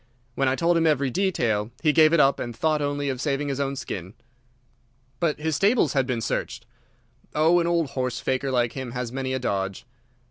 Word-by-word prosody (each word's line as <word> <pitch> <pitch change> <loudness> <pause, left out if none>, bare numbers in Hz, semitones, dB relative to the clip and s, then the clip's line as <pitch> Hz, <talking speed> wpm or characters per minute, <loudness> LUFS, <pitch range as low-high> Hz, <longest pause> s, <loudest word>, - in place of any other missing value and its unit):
When 135 +2 0
I 130 - +2
told 170 +3 +2
him 165 -1 +3
every 140 -4 +1
detail 120 - 0
he 155 -2 +4
gave 155 0 +6
it 170 - +3
up 140 -1 +4
and 120 -2 -5
thought 155 +3 +1
only 145 0 -1
of 130 -2 -2
saving 145 0 -1
his 140 0 -3
own 140 0 -1
skin." 95 -7 -6 1.0
"But 160 -3 0
his 155 0 -1
stables 200 - +3
had 135 -2 +1
been 120 -3 -1
searched?" 115 - -3 0.7
"Oh, 160 +3 +4
an 170 - 0
old 170 -4 0
horse 125 -3 -2
faker 130 +1 -1
like 120 -3 +1
him 130 -3 -6
has 125 -2 -4
many 130 0 -3
a 130 - 0
dodge." 100 -6 -3
135 Hz, 205 wpm, -25 LUFS, 125-155 Hz, 1.0 s, gave